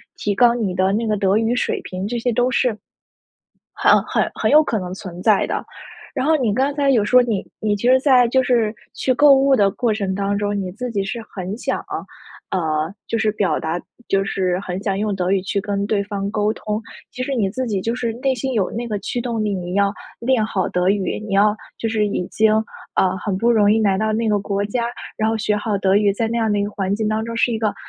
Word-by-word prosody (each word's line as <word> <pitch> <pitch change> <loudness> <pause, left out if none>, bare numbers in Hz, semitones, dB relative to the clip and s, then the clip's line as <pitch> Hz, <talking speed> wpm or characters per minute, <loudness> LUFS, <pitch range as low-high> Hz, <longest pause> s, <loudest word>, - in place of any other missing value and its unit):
提 205 - -1
高 240 +2 +4
你 210 -6 -1
的 190 +1 +1
那 225 +2 0
个 215 -1 0
德 195 +1 +2
语 225 +2 +1
水 - - -1
平， 185 +2 -5
这 240 +3 -2
些 240 +1 0
都 245 +2 +2
是， 250 - +2 1.1
很 - - +4
很 - - +1
很 - - 0
有 305 +1 +6
可 225 -7 -1
能 180 -1 -5
存 180 -2 -8
在 215 -2 +3
的。 - - -2 0.5
然 260 - -1
后 320 - +4
你 235 -7 0
刚 275 +4 +1
才 285 -1 +1
有 230 -6 +3
说 250 +4 +5
你 220 -5 -2 0.2
你 210 -1 0
其 235 +5 0
实 260 +1 +5
在 255 -3 +5
就 260 +2 +3
是 230 -4 +1 0.2
去 260 - +1
购 285 +2 +6
物 270 0 +4
的 200 -5 +4
过 235 +2 0
程 200 -3 -2
当 200 +1 -1
中， 205 0 -1
你 185 -2 -4
自 245 +5 -5
己 200 -3 0
是 235 +5 -4 0.2
很 190 +3 -5
想， - - -2 0.7
呃， 160 -1 -1
就 230 - 0
是 215 -1 +1
表 200 -7 0
达 165 +2 -2 0.3
就 195 0 +1
是 185 -2 -1
很 185 -1 -4
想 195 -2 -1
用 205 -1 -1
德 185 0 0
语 195 -1 +2
去 200 +1 -1
跟 200 0 -2
对 200 -2 +1
方 200 -1 -3
沟 210 0 +1
通， 210 -1 -4 0.3
其 250 - -10
实 275 - -2
你 205 -6 0
自 255 +5 -3
己 205 -5 -1
就 230 +5 -2
是 235 -2 -2
内 270 -1 +2
心 260 +1 -3
有 200 -6 0
那 235 +2 -4
个 210 -2 -2
驱 245 - -3
动 235 -2 -2
力， 210 - 0
你 180 -1 -4
要 200 0 +2 0.3
练 235 -2 +2
好 190 -4 -1
德 180 +1 0
语， 195 -1 0
你 195 - -2
要 210 +2 +4 0.2
就 225 - -2
是 215 -1 +1
已 190 -3 -2
经， 220 0 +3 0.4
呃， 185 0 +2
很 200 -3 -2
不 230 +4 +2
容 210 -3 +4
易 220 +1 +2
来 195 -2 +2
到 215 +1 0
那 225 +1 0
个 210 -1 +2
国 200 0 -2
家， 235 +3 -1 0.3
然 220 0 +1
后 225 - 0
学 210 -1 0
好 210 0 -1
德 195 0 +3
语， 205 -1 +3
在 225 +2 -1
那 235 +1 -1
样 220 -2 +1
的 205 - +1
一 - - +1
个 205 - -4
环 195 -1 -1
境 215 0 -1
当 215 +1 -1
中 230 0 -5
是 240 - +2
一 225 - -1
个， 215 -2 0
210 Hz, 270 characters per minute, -20 LUFS, 195-235 Hz, 1.1 s, 有